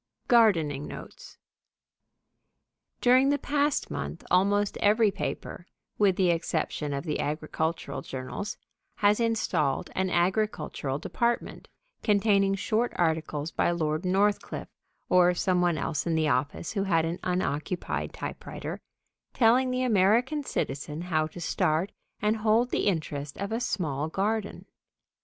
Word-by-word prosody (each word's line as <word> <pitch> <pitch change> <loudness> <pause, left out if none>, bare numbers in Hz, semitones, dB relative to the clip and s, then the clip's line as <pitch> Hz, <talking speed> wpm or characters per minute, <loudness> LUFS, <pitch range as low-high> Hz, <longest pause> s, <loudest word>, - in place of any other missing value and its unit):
V - - -40
GARDENING 165 - +4
NOTES - - -10 1.6
During 255 +2 +5
the 285 - +3
past 290 +1 0
month - - -5
almost 200 +2 +3
every 210 +1 +4
paper, 180 -1 -5 0.3
with 200 -3 +4
the 180 -2 +3
exception 160 -3 -2
of 140 0 -3
the 155 -3 -2
agricultural 155 +2 -2
journals, 135 +9 -5 0.4
has 205 +1 +3
installed 225 -11 0
an 190 0 0
agricultural 175 -7 0
department, 235 +9 -2 0.3
containing 200 -2 +3
short 220 +4 0
articles 160 -2 -1
by - - +1
Lord 155 -1 -1
Northcliffe, 200 +3 0 0.4
or 180 0 +4
some 180 0 +1
one 175 -2 +2
else 150 +2 -2
in 165 - +1
the 155 -1 +2
office 135 +5 -1
who 200 -2 -1
had 165 -4 +2
an 165 +2 -3
unoccupied 180 -1 -2
typewriter, - - -6 0.5
telling 255 +2 +4
the 255 0 0
American 235 +6 +3
citizen 150 - -3
how 160 -3 0
to 160 - -11
start 165 +1 0 0.3
and 210 +2 +1
hold 225 +3 +2
the - - 0
interest 150 -6 -2
of 200 +2 -4
a 225 - 0
small 155 - -1
garden. 205 +5 -2
185 Hz, 130 wpm, -28 LUFS, 155-215 Hz, 1.6 s, During